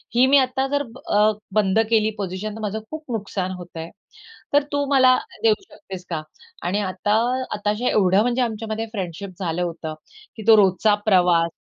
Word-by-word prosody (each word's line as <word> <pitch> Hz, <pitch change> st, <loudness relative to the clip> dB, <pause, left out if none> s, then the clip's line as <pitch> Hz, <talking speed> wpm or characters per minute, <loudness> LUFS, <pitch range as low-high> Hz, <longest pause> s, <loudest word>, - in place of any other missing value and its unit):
ही 250 Hz, +2 st, +6 dB
मी 280 Hz, +2 st, +6 dB
आता 265 Hz, 0 st, +1 dB
जर 285 Hz, +1 st, 0 dB
अ, 215 Hz, -4 st, +1 dB
ब 210 Hz, -, -9 dB, 0.2 s
बंद 210 Hz, 0 st, +3 dB
केली 220 Hz, -2 st, +3 dB
पोझिशन 200 Hz, +2 st, -4 dB
तर -, -, -8 dB
माझं 215 Hz, 0 st, -3 dB
खूप 315 Hz, 0 st, -6 dB
नुकसान 195 Hz, -4 st, -3 dB
होत 175 Hz, -1 st, -9 dB
आहे. 165 Hz, 0 st, -6 dB, 0.6 s
तर 290 Hz, 0 st, +5 dB
तू 285 Hz, -1 st, 0 dB
मला 260 Hz, -1 st, +6 dB, 0.3 s
देऊ 225 Hz, -1 st, +6 dB, 0.2 s
शकतेस 185 Hz, -2 st, -10 dB
का?" 165 Hz, -3 st, -2 dB, 0.5 s
आणि 195 Hz, +4 st, 0 dB
आता 205 Hz, +3 st, 0 dB, 0.4 s
आता 210 Hz, 0 st, -1 dB
हे 250 Hz, -, +1 dB
एवढं 195 Hz, -1 st, +3 dB
म्हणजे 245 Hz, +2 st, +1 dB
आमच्यामध्ये 220 Hz, -1 st, -2 dB
फ्रेंडशिप 195 Hz, -2 st, -5 dB
झालं 175 Hz, -2 st, -2 dB
होतं, 165 Hz, -2 st, -4 dB, 0.4 s
की 220 Hz, -, -8 dB
तो 225 Hz, -, +9 dB
रोजचा 205 Hz, +1 st, +4 dB
प्रवास 175 Hz, -4 st, +3 dB
210 Hz, 180 wpm, -22 LUFS, 185-230 Hz, 0.6 s, तो